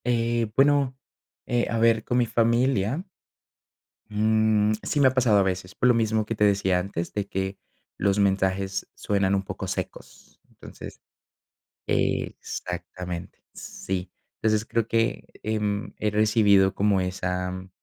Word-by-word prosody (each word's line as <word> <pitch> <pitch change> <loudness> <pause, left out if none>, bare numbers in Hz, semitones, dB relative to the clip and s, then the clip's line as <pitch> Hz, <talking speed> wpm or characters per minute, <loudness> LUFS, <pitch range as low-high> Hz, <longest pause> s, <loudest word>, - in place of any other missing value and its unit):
Eh, 115 -2 +1
bueno, 140 -1 +3 0.5
eh, 120 -1 0
a 115 - -1
ver, 115 -1 +3
con 120 - -1
mi 120 - +3
familia, 115 - +1 1.1
mm, 110 0 +2
sí 145 - -1
me 135 - +7
ha 130 - -2
pasado 120 -5 +4
a - - +5
veces, 95 -1 -3
por 125 - +2
lo 125 - +5
mismo 110 -1 +1
que 115 - -2
te 105 - +2
decía 95 -3 +3
antes, 90 -2 -4
de 105 -1 -2
que, 95 0 -3 0.4
los 100 +1 +1
mensajes 95 -1 0
suenan 100 -1 0
un 95 - +1
poco 95 - -6
secos, - - -7
entonces. - - -11 0.9
Exactamente, 90 0 -3
sí. 90 -1 -5 0.3
Entonces 110 -1 +1
creo 115 -1 -1
que, 115 0 0 0.2
em, 105 -1 -2
he 105 - 0
recibido 105 -2 +4
como 100 -2 +2
esa, 90 0 -3
105 Hz, 140 wpm, -25 LUFS, 95-115 Hz, 1.1 s, me